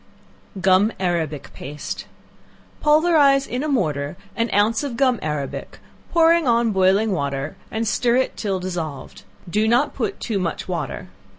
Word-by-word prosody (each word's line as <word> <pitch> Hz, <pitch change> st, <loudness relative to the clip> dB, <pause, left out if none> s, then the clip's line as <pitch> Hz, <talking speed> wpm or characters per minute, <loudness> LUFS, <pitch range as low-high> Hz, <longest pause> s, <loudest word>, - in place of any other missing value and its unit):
Gum 190 Hz, +3 st, +4 dB
Arabic 165 Hz, -6 st, -2 dB
Paste. 145 Hz, +2 st, -6 dB, 0.7 s
Pulverize 300 Hz, -3 st, +4 dB
in 250 Hz, -, -3 dB
a 305 Hz, -, -2 dB
mortar 155 Hz, -, -1 dB, 0.2 s
an 230 Hz, 0 st, 0 dB
ounce 215 Hz, +3 st, +2 dB
of 260 Hz, -5 st, -4 dB
gum 255 Hz, -4 st, +2 dB
arabic, 150 Hz, -3 st, -4 dB, 0.3 s
pour 330 Hz, 0 st, +5 dB
on 235 Hz, -8 st, +2 dB
boiling 195 Hz, +3 st, +3 dB
water 140 Hz, -2 st, -2 dB
and 225 Hz, +1 st, -2 dB
stir 235 Hz, +3 st, +2 dB
it 260 Hz, +1 st, +1 dB
till 195 Hz, -3 st, -2 dB
dissolved; 170 Hz, -6 st, -5 dB, 0.3 s
do 210 Hz, +5 st, +1 dB
not 245 Hz, +6 st, +2 dB
put 240 Hz, -, -3 dB
too 215 Hz, -4 st, -2 dB
much 170 Hz, -3 st, -3 dB
water. -, -, -4 dB
210 Hz, 140 wpm, -22 LUFS, 170-255 Hz, 0.7 s, pour